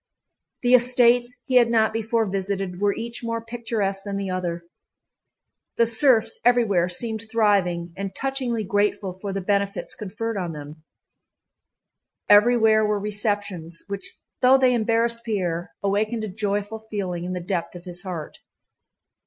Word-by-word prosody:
The 245 +1 +3
estates 245 0 +4
he 255 -1 +3
had 240 -2 +5
not 220 -2 +2
before 225 0 0
visited 195 -1 -3
were 205 -1 +2
each 235 +1 -5
more 230 0 -2
picturesque 225 -4 -2
than 200 -1 -4
the 195 -1 -3
other; 175 -2 -3 1.1
the 235 - +5
serfs 230 -1 +3
everywhere 220 -8 +3
seemed 220 +4 0
thriving 190 -6 +1
and 195 0 -5
touchingly 260 -4 -2
grateful 205 -1 0
for 200 0 -4
the 195 0 -3
benefits 200 +1 -1
conferred 215 +2 -5
on 175 -3 -3
them. 150 +1 -10 1.4
Everywhere 220 0 +5
were 210 -1 +1
receptions, 205 -5 -3
which 200 0 -5 0.2
though 255 +1 +6
they 260 -1 +3
embarrassed 230 0 +1
Pierre 180 -7 -2
awakened 215 +3 0
a 215 - -3
joyful 205 +1 -2
feeling 185 -5 -3
in 180 +1 -4
the 180 - -3
depth 175 -1 -3
of 175 +1 -10
his 175 -1 -4
heart. 175 -5 -7
205 Hz, 145 wpm, -24 LUFS, 190-230 Hz, 1.4 s, though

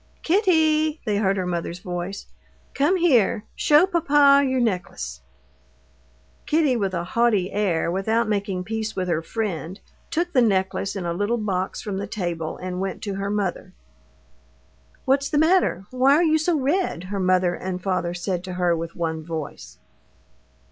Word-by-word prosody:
"Kitty," 315 -5 +2
they 210 -3 0
heard 195 -1 +1
her 185 - -1
mother's 175 -1 -3
voice, 180 +2 -5 0.5
"come 295 +7 +2
here, 250 - +3
show 300 +4 +5
papa 290 -6 +4
your 260 -1 0
necklace." 175 - -2 1.3
Kitty, 300 -4 +2
with 195 -5 -1
a 170 - -2
haughty 205 -1 +1
air, 185 -5 0
without 220 +5 0
making 200 -3 -1
peace 220 +2 -4
with 185 -1 -2
her 165 -2 0
friend, 185 -1 -4 0.3
took 350 +2 -1
the 255 - +5
necklace 195 -2 0
in 190 -3 -4
a 170 - -1
little 205 +7 0
box 190 -4 -2
from 200 -2 -4
the 200 +1 -4
table 175 -6 -4
and 180 0 -5
went 195 -1 -4
to 200 - -3
her 195 +1 -3
mother. 205 -3 -2 1.3
"What's 275 +1 +2
the 295 - 0
matter? 320 - +3
Why 260 +2 +4
are 335 - +3
you 315 -1 +3
so 315 0 +1
red?" 280 - 0
her 200 - -1
mother 185 -1 +2
and 185 +1 -4
father 180 -2 -2
said 180 0 -3
to 185 - -6
her 180 -1 +1
with 165 0 -5
one 160 -2 -3
voice. 160 -3 -7
200 Hz, 160 wpm, -23 LUFS, 180-275 Hz, 1.3 s, show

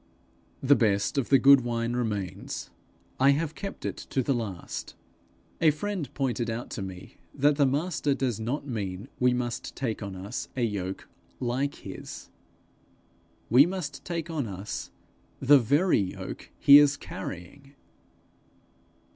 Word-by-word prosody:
The 140 +2 +6
best 105 +2 +2
of 130 - -2
the 135 - +7
good 135 +1 +7
wine 115 -1 -2
remains; 105 -7 -3 0.5
I 135 +2 +6
have 155 +1 -2
kept 195 +4 -7
it - - -3
to 130 - -2
the 140 - +1
last. 105 -8 -5 0.7
A 160 - +6
friend 165 -1 -3
pointed 125 -4 -1
out 115 +2 -4
to 110 - -4
me 95 -1 -8 0.2
that 145 +1 +3
the 140 -2 +4
Master 145 0 0
does 125 -6 -1
not 125 +6 -3
mean 100 -7 -4
we 125 0 +4
must 125 -1 -3
take 115 -5 -3
on 100 -2 -5
us 100 +6 -5
a 125 - +1
yoke 100 -4 -3 0.3
like 130 +3 -1
his; - - -8 1.2
we 130 +7 +7
must 175 -6 -5
take 170 -2 -3
on 145 -7 -2
us 100 +1 -5 0.5
the 140 +1 +7
very 145 - +3
yoke 95 -2 -5
he 140 +1 +9
is 145 -1 +4
carrying. 135 +11 -8
130 Hz, 145 wpm, -28 LUFS, 110-145 Hz, 1.2 s, he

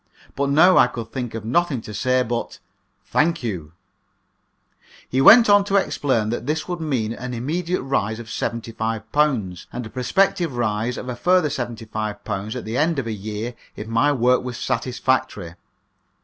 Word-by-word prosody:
But 140 0 0
now 170 +6 +6
I - - +6
could 115 -2 -7
think 125 -4 -4
of 110 -1 -6
nothing 150 +2 +1
to 105 - -9
say 130 +4 +1
but 120 -1 -4 0.5
"Thank 165 -2 +1
you." 85 -9 -4 1.3
He 130 - 0
went 230 - +9
on 205 -1 +6
to 200 0 -1
explain 130 - +1
that 120 +1 -4
this 155 +1 -1
would 175 -1 -3
mean 125 -8 -1
an 125 +1 -6
immediate 165 +7 -2
rise 110 -5 -1
of 120 - -8
£75, 115 - -2
and 125 -1 -5
a - - -8
prospective 145 +2 +1
rise 115 +1 -1
of - - -6
a 125 - -3
further 180 +3 +3
£75 110 -3 -4
at 125 - -5
the 110 +3 -3
end 160 +1 +1
of 135 - -1
a 115 - -3
year 110 +3 -5 0.2
if 105 - -7
my 115 +6 +2
work 125 -2 +2
was 125 -1 -5
satisfactory. 125 -10 -1
125 Hz, 165 wpm, -22 LUFS, 110-145 Hz, 1.3 s, went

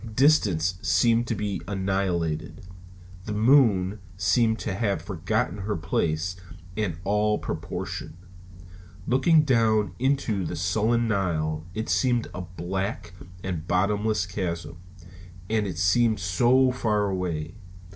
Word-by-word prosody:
Distance 95 - +3
seemed 120 0 +3
to 115 - -1
be 105 -2 -3
annihilated. 95 -5 -2 0.6
The 105 - -3
moon 105 -5 +4 0.2
seemed 110 +3 +2
to 100 - -2
have 100 -3 0
forgotten 95 +5 -2
her 105 +2 -2
place 80 +2 -1 0.4
and 100 -6 -2
all 105 +1 +1
proportion. 85 - -5 0.9
Looking 150 +5 +4
down 110 - +2
into 130 -7 0
the 80 - -4
sullen 110 +7 +1
Nile, 80 -6 -1
it 110 +1 -3
seemed 120 -3 +1
a 90 - -5
black 90 +1 -4 0.3
and 90 -3 -4
bottomless 100 +1 +1
chasm. 85 -4 -4 0.7
And 110 -2 +1
it 90 -4 -5
seemed 110 +5 +3
so 120 +8 +3
far 110 -4 0
away! 90 -5 -3
100 Hz, 115 wpm, -26 LUFS, 90-115 Hz, 0.9 s, moon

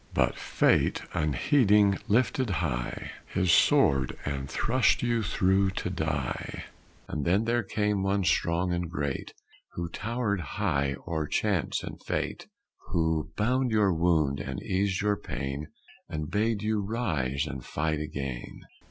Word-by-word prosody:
But - - +2
Fate, - - +2
unheeding, 100 - +3
lifted 125 +2 +2
high - - -2 0.2
His 90 -2 +1
sword, 65 -5 +4
and 70 -1 -3
thrust 130 -1 +2
you 120 -1 +1
through 95 0 +2
to 90 - -2
die, 80 -6 -3 0.4
And 75 - -3
then 95 +7 +2
there 120 +1 +2
came 105 -1 0
one 95 +1 +1
strong 90 0 +1
and 85 -1 -2
great, 75 -5 -3 0.4
Who 85 -1 -4
towered 105 +1 -2 0.2
high 70 0 +1
o'er 80 -3 -1
Chance 100 -4 0
and - - -7
Fate, - - -3 0.4
Who 80 -2 0
bound 125 +5 +2
your 105 -4 +3
wound 80 -5 +2
and 70 - -4
eased 95 0 0
your 105 -1 +2
pain 70 -2 -4 0.4
And 75 -1 -4
bade 105 0 +1
you 110 -1 +1
rise 80 - -1
and 70 -4 -6
fight 75 +3 -1
again. 70 -5 -5
90 Hz, 135 wpm, -28 LUFS, 75-105 Hz, 0.4 s, sword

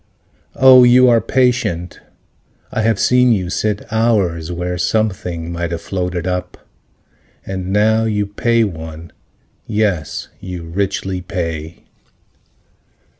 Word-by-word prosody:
Oh, 130 -1 +7
you 125 +1 +6
are 115 -1 +4
patient, 110 -10 0 0.7
I - - -1
have 110 -2 +1
seen 125 0 +4
you 90 -5 0
sit 105 +1 -1
Hours, 95 -8 +1
where 90 +1 -3
something 90 -5 -1
might 85 0 -3
have 85 -1 -5
floated 90 -2 -3
up. 90 0 -3 0.9
And 95 -1 -4
now 110 +2 +2
you 105 -2 0
pay 115 +3 +1
one. 80 -4 -6 0.6
Yes, 100 -8 -1
you 90 -2 -7
richly 95 +1 -3
pay. 85 -3 -5
95 Hz, 115 wpm, -17 LUFS, 85-110 Hz, 0.9 s, Oh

